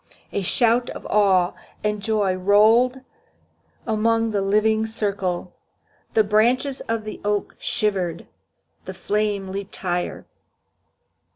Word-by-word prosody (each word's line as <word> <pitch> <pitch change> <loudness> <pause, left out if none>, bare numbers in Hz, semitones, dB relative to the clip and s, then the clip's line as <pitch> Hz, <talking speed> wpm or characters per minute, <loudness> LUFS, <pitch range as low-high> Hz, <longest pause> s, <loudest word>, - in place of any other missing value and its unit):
A 200 - -1
shout 235 +5 +2
of - - -8
awe 190 -4 +3 0.3
and 210 -1 -1
joy 205 -2 +1
rolled 215 +7 +4 0.8
along 225 +1 +1
the 205 -2 0
living 215 +2 +2
circle. 195 -5 -3 0.6
The 220 - +5
branches 240 +6 +1
of 225 -1 -1
the 215 - -8
oak 205 0 -1
shivered. 185 -6 -1 0.6
The - - -7
flames 205 -2 -1
leaped 200 0 -5
higher. 180 -1 -3
210 Hz, 110 wpm, -22 LUFS, 195-220 Hz, 0.8 s, The